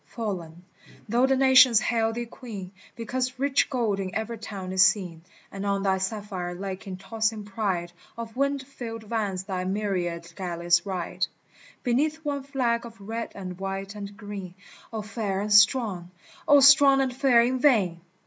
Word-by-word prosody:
fallen, 180 -6 -5 0.4
though 240 +4 +3
the 270 - +3
nations 260 -3 +7
hail 225 -1 +1
thee 240 +1 -3
Queen 215 -6 -9 0.2
Because 250 +2 -3
rich 275 +1 +2
gold 230 -7 0
in 190 -1 -4
every 220 +1 -3
town 195 -4 -6
is 190 0 +2
seen, 180 -5 +3 0.3
And 195 0 -6
on 200 -1 0
thy 190 -1 +1
sapphire 190 -3 -4
lake 190 +2 -6
in 185 -1 -5
tossing 220 +2 -2
pride 195 -4 -2 0.3
Of 230 -1 -7
wind 280 +1 0
filled 235 -4 -7
vans 205 -4 -2
thy 190 -2 -3
myriad 180 -4 -2
galleys 175 -1 0
ride 185 0 -2 0.6
Beneath 300 +6 0
one 285 -1 -1
flag 255 -4 -1
of 230 -2 -11
red 225 +3 -5
and 185 -2 -7
white 195 +1 -4
and 205 -1 -8
green. 200 -4 -7 0.4
O 220 -2 -4
Fair 210 -3 -3
and 210 0 0
Strong! 205 -4 +4 0.4
O 285 -1 +7
Strong 280 -1 +7
and 260 -2 -1
Fair 255 -3 +5
in 255 +2 0
vain 200 - +3
210 Hz, 165 wpm, -26 LUFS, 190-240 Hz, 0.6 s, nations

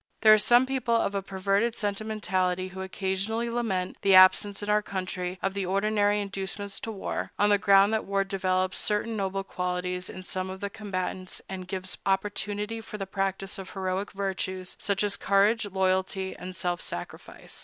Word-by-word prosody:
There 215 -1 +9
are 215 - +6
some 240 +4 +5
people 255 -3 0
of 225 -3 +1
a 200 - 0
perverted 195 +4 0
sentimentality 195 -4 -1
who 190 +1 -7
occasionally 195 +5 -2
lament 195 -7 -1
the 195 -1 +5
absence 195 +2 +6
in - - -4
our 210 0 +3
country 185 -2 -4
of 195 - 0
the 195 -2 -2
ordinary 205 +1 +2
inducements 200 0 -4
to 225 - -5
war, 200 - -4
on 205 - +4
the 205 -1 +4
ground 200 +1 +5
that 220 - 0
war 195 0 +1
develops 185 -1 0
certain 215 +2 -1
noble 195 -1 -1
qualities 180 0 -3
in 185 - -8
some 185 0 -3
of 190 0 -6
the 200 0 -4
combatants, 185 -3 -4
and 185 -1 -6
gives 185 -1 -5
opportunity 205 +3 -1
for 220 -1 -8
the 195 - -3
practice 195 +1 -3
of 190 - -7
heroic 190 0 -2
virtues, 190 -1 -3
such 200 0 0
as 205 -1 0
courage, 205 +3 +3
loyalty, 190 0 0
and 185 0 -8
self 175 0 -1
sacrifice. 85 - -8
195 Hz, 175 wpm, -28 LUFS, 185-205 Hz, -, There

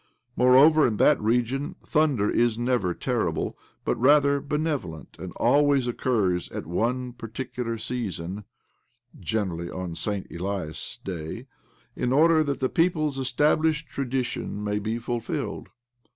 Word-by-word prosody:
Moreover, 135 +5 +6
in 110 -3 -2
that 150 +2 +4
region 125 - 0
thunder 145 -10 +2
is 120 0 +2
never 120 -6 +1
terrible, - - -1 0.3
but, - - +1
rather, 140 +1 +5
benevolent, 145 - -3
and - - -6
always 145 -2 +3
occurs 110 -7 0
at - - -6
one 120 +8 -1
particular 120 0 -5
season 105 -5 -4 0.4
( 120 0 -24
gene 110 -4 -1
rally 85 0 -5
on 90 -2 -5
Saint 100 +3 -3
Elias' 90 -3 -4
Day, 80 -5 -6 0.5
in 125 - -1
order 160 +3 +5
that 140 -2 -2
the 130 - +3
people's 155 -3 +1
established 150 +4 +1
tradition 130 -5 -3
may 105 0 -1
be 110 +2 -2
ful 120 0 -2
filled - - -4
120 Hz, 135 wpm, -26 LUFS, 105-140 Hz, 0.5 s, Moreover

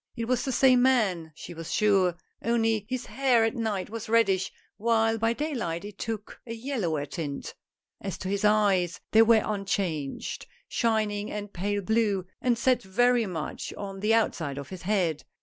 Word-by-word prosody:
It 230 -2 -3
was 250 +1 0
the 265 - -1
same 255 -1 +5
man, 205 -11 +2
she 175 - -9
was 165 -1 -7
sure, 195 -5 +3 0.3
only 225 -3 +1
his 255 -1 -3
hair 250 -1 +2
at 225 - +1
night 215 -5 -2
was 225 -1 -6
reddish, 195 -5 +3 0.3
while 225 0 +2
by 225 +1 +2
day 300 +5 -3
light 170 -7 -3
it 205 -1 -10
took 220 -2 -5
a 230 - -4
yellower 220 - -2
tint. 145 -1 -5 0.5
As 195 - -4
to 185 - -6
his 200 +1 -1
eyes 200 -5 +3
they 220 - +7
were 225 -1 +5
unchanged 190 -8 -2
— - - -36
shining 215 -2 0
and 205 -1 -6
pale 200 +2 -1
blue 210 -3 +1
— - - -50
and 245 -2 +2
set 250 0 +2
very 240 +3 +2
much 165 -5 -5
on 195 -1 -6
the 215 +3 +3
outside 165 -10 0
of 140 -1 -6
his 185 -2 -8
head. 180 -6 0
210 Hz, 185 wpm, -27 LUFS, 185-230 Hz, 0.5 s, they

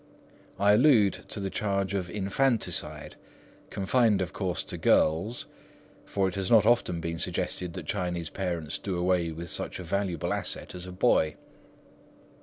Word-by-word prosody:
I 100 +1 +4
allude 110 -4 +4
to - - -3
the 95 -1 -3
charge 100 -1 -1
of 95 -3 -2
infanticide, 110 +6 -1 0.5
confined 105 +1 +2
of 90 -2 -3
course 95 -3 -2
to - - -6
girls, 90 +10 +2 0.6
for 100 -2 0
it 95 - -3
has 95 -1 -1
not 110 -3 +6
often 115 -7 +2
been 85 0 -4
suggested 90 0 -2
that 90 -3 -7
Chinese 90 -2 -2
parents 85 -5 -3
do 95 -3 -3
away 90 -1 +1
with 85 +1 -6
such - - -3
a 90 - -7
valuable 90 -2 -1
asset - - -2
as 90 0 -6
a - - -7
boy. 90 -6 +2
95 Hz, 155 wpm, -28 LUFS, 85-100 Hz, 0.6 s, not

